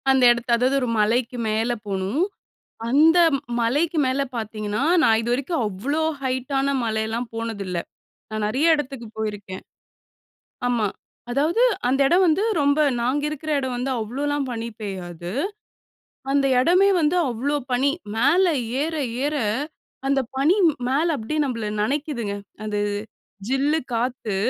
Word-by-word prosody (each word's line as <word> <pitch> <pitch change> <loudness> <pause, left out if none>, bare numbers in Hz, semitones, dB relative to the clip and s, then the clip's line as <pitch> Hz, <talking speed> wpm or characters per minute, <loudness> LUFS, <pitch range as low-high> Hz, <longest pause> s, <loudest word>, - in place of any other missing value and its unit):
அந்த 265 -1 +4
இடத்த 240 0 -2
அதாவது 255 +3 +2
ஒரு 250 - 0
மலைக்கு 235 +3 +1
மேல 220 +3 0 0.2
போணும். 195 - -1 0.7
அந்த 310 +7 +5 0.4
மலைக்கு 290 +9 +1
மேல 260 +2 +1
பார்த்தீங்கன்னா, 215 +1 -3 0.2
நான் 225 -4 +4
இதுவரைக்கும் 250 +6 -1
அவ்ளோ 250 +11 -2 0.2
ஹைட்டான 270 +2 0
மலையெல்லாம் 220 +1 -1
போனதில்ல. 210 -5 -4 0.5
நான் 215 -1 -3
நெறைய 290 +9 +3
இடத்துக்கு 270 -5 -5
போயிருக்கேன். 205 -3 -5 1.0
ஆமா, 240 -3 +1 0.4
அதாவது 305 - +2 0.3
அந்த 270 +2 +1
இடம் 360 +4 +4
வந்து 335 +4 +3 0.2
ரொம்ப 285 +1 +3 0.2
நாங்க 255 +5 0
இருக்குற 305 +1 -5
இடம் 260 -2 -3
வந்து 250 +2 -2
அவ்ளோலாம் 280 +5 -2
பனி 230 -1 -4
பெய்யாது. 175 -4 -6 1.0
அந்த 275 0 +3
இடமே 365 +9 +4
வந்து 310 +3 +2
அவ்ளோ 255 +5 -1 0.2
பனி. 255 +3 +3 0.3
மேல 295 +11 +4 0.4
ஏற, 320 +1 -3 0.3
ஏற 295 +1 0 0.7
அந்த 275 0 +3 0.2
பனி 295 +7 +4 0.3
மேல 290 +6 +2
அப்டியே 260 +7 -3
நம்மள 230 -5 -3 0.2
நெனைக்கிதுங்க. 245 -4 -2 0.3
அது 210 -1 -2 0.7
ஜில்லு 280 +5 +1
காத்து, 235 -3 -1
255 Hz, 125 wpm, -23 LUFS, 220-290 Hz, 1.0 s, அந்த